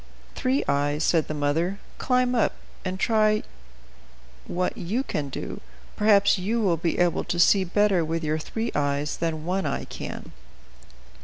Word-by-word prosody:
"Three 265 +2 0
Eyes," 145 +2 +1
said 160 -2 +2
the 155 - -4
mother, 160 +6 0 0.2
"climb 250 -1 +2
up, 235 - +2 0.3
and 185 0 -3
try 215 0 +3 1.0
what 180 +1 -1
you 215 +10 -2
can 145 - -3
do; - - -6 0.3
perhaps 205 -2 +4
you 215 +6 0
will 190 -6 +2
be 165 +1 -1
able 175 -1 +2
to 175 - -2
see 190 +3 +5
better 190 -1 +2
with 165 +1 -2
your 155 +1 0
three 225 +8 -3
eyes 145 +1 -1
than 160 -2 -2
One 190 +2 -1
Eye - - -2
can." - - -7
180 Hz, 155 wpm, -25 LUFS, 155-215 Hz, 1.0 s, see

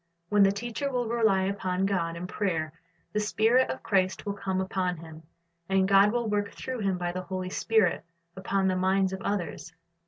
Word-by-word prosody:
When 205 -1 +4
the 195 0 +6
teacher 240 +7 -3
will 245 -2 -1
rely 220 -5 +2
upon 190 -1 -1
God 170 -4 -1
in 175 - -5
prayer, 170 -6 -2 0.4
the 210 - +1
Spirit 225 +4 +3
of - - -5
Christ 190 -2 +1
will 200 - -2
come 190 -1 -2
up 190 +1 -4
on 180 -2 0
him, 160 -1 -11 0.5
and 190 0 +3
God 200 +1 +6
will 240 0 -1
work 205 -1 -1
through 255 -2 -5
him 195 -3 0
by 175 -1 -2
the 185 +1 -4
Holy 185 0 -5
Spirit 220 -5 +2 0.3
upon 195 0 0
the 185 - +1
minds 190 +1 +2
of 190 - -5
others. 175 -3 -3
195 Hz, 195 wpm, -28 LUFS, 185-210 Hz, 0.5 s, the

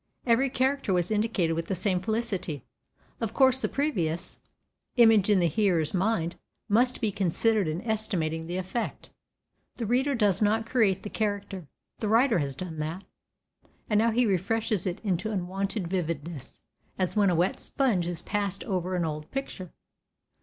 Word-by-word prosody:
Every 250 +3 +3
character 265 -4 0
was 180 +2 0
indicated 210 -6 +1
with 165 0 -3
the 190 - -1
same 185 0 +1
felicity. 195 - -2 0.6
Of 225 0 -3
course 265 -1 +4
the - - 0
previous 180 - -1 0.6
image 225 -5 +6
in 205 - +5
the 175 -2 +3
hearer's 170 -3 +1
mind 185 -3 0 0.3
must 245 +5 +2
be 220 -3 +1
considered 200 +1 +1
in 160 +6 -3
estimating 185 -8 -1
the 175 +1 -3
effect. 190 +6 -4 0.6
The 235 - -3
reader 260 +5 +1
does 205 -5 +2
not 220 +2 +2
create 220 -6 +2
the 205 - -6
character, 200 -5 -3 0.3
the 215 - -1
writer 230 0 +4
has 140 -3 -2
done 165 0 -6
that; 160 +5 -4 0.9
and 210 - +4
now 230 +1 +4
he 240 +2 +2
refreshes 205 0 0
it 180 - -3
into 195 +1 -1
unwonted 195 0 -2
vividness, 165 -5 -4 0.3
as 185 +1 -1
when 205 -2 +4
a 175 - +2
wet 175 +3 +1
sponge 220 -11 0
is 175 -1 -4
passed 200 -2 -2
over 185 -5 -2
an 175 -2 0
old 150 -1 -5
picture. 220 -10 -5
195 Hz, 160 wpm, -28 LUFS, 175-225 Hz, 0.9 s, image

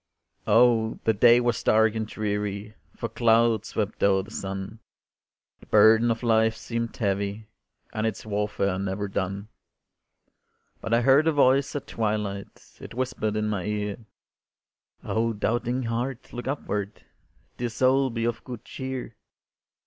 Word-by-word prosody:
Oh! 115 0 +4
the 110 - +3
day 120 +3 +6
was 120 -2 0
dark 110 0 +4
and 110 -1 -3
dreary, 105 -1 -3 0.2
For 115 - -3
clouds 115 -1 +2
swept 105 -1 -3
o'er 95 -1 +3
the 100 - -13
sun, 95 +2 -5 0.8
The - - -18
burden 110 +2 +6
of 115 +1 -1
life 110 -1 +3
seemed 115 0 -4
heavy, 100 0 -2 0.5
And 110 +1 0
its 110 - -5
warfare 100 -2 -1
never 100 +1 -2
done; 100 +2 -3 1.3
But 115 - -5
I 115 +1 +4
heard 135 +5 +5
a - - +5
voice 140 -1 +3
at 145 - -3
twilight, 105 -3 -4
It - - -9
whispered 125 -4 -2
in 105 0 0
my 100 -4 -2
ear, 105 -1 -2 1.1
"Oh, 115 +1 0
doubting 120 +4 -1
heart, 120 +3 -4
look 120 +1 -6
upward, 105 -7 -3 0.5
Dear 120 0 -2
soul, 130 +3 +2
be 115 -1 -2
of 115 -1 -2
good 125 -3 -8
cheer. 130 -3 -6
110 Hz, 140 wpm, -26 LUFS, 105-120 Hz, 1.3 s, day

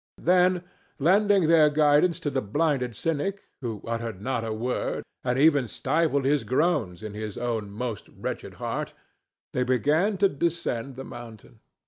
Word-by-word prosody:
Then, 180 0 +3 0.3
lending 195 +4 +4
their 160 -2 +6
guidance 150 +3 +3
to 145 - -1
the 135 - 0
blinded 125 +1 0
cynic, 165 - -2 0.2
who 115 -5 -5
uttered 115 -3 -3
not 115 +2 -2
a 110 - -3
word, 120 +4 -2 0.2
and 125 0 0
even 145 -3 +4
stifled 140 +3 0
his 145 +1 +2
groans 130 - 0
in 105 -1 -6
his 105 -1 -5
own 115 -4 -2
most 110 +1 -5
wretched - - -6
heart, - - -4 0.6
they 125 - 0
began 145 - +2
to 200 +1 +5
descend 140 -6 -2
the 135 +1 -7
mountain. 120 -4 -11
135 Hz, 150 wpm, -26 LUFS, 115-165 Hz, 0.6 s, their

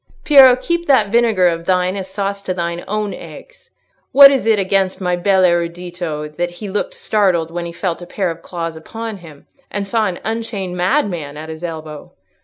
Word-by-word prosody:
"Piero, 270 -4 +8
keep 340 +6 -2
that 225 -8 +3
vinegar 225 -6 +3
of 170 -1 -2
thine 185 0 +1
as 190 -1 -5
sauce 200 0 -3
to 185 -2 -3
thine 170 0 -3
own 210 0 -2
eggs! - - -12 0.4
What 275 0 +9
is 265 -4 0
it 220 -1 +4
against 190 -1 0
my 180 -2 0
bel 190 +1 +2
erudito 170 -2 -1
that 175 0 -1
he 185 +4 -8
looked 205 - -3
startled 180 -6 +1
when 170 0 -4
he - - -7
felt 170 0 -3
a 175 - -9
pair 185 -1 -2
of 165 0 -9
claws 165 -2 -5
upon 225 +7 -7
him 160 -6 -15 0.2
and 200 0 -4
saw 220 0 +1
an 180 - -4
unchained 220 -5 -4
madman 180 - -1
at 155 +1 -8
his 160 +1 -8
elbow? 155 -3 -7
185 Hz, 195 wpm, -18 LUFS, 170-210 Hz, 0.4 s, What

